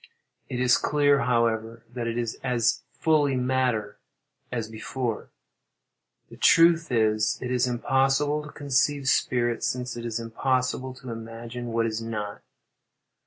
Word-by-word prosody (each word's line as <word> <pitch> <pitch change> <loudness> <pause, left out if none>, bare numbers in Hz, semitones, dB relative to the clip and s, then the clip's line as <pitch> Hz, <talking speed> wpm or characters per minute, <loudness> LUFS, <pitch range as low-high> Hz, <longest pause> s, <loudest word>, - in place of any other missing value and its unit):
It 125 - -3
is 125 0 +4
clear, 145 -1 +2
however, 115 -2 0
that 120 -2 -3
it 115 0 -2
is 115 -2 -3
as 120 -3 +1
fully 150 -4 +2
matter 125 -4 0 0.5
as 115 -3 -2
before. 115 +1 -4 1.0
The - - -11
truth 165 -1 +5
is, 110 -2 +2
it 125 -1 -4
is 125 0 +2
impossible 135 +4 +1
to 150 - -10
conceive 140 0 0
spirit, 120 -2 +1
since 125 -1 -2
it 120 - -6
is 115 -1 -3
impossible 130 +2 -1
to 130 -1 -9
imagine 115 +1 -7
what 115 0 0
is 110 0 -2
not. 105 -2 -5
125 Hz, 135 wpm, -26 LUFS, 115-130 Hz, 1.0 s, truth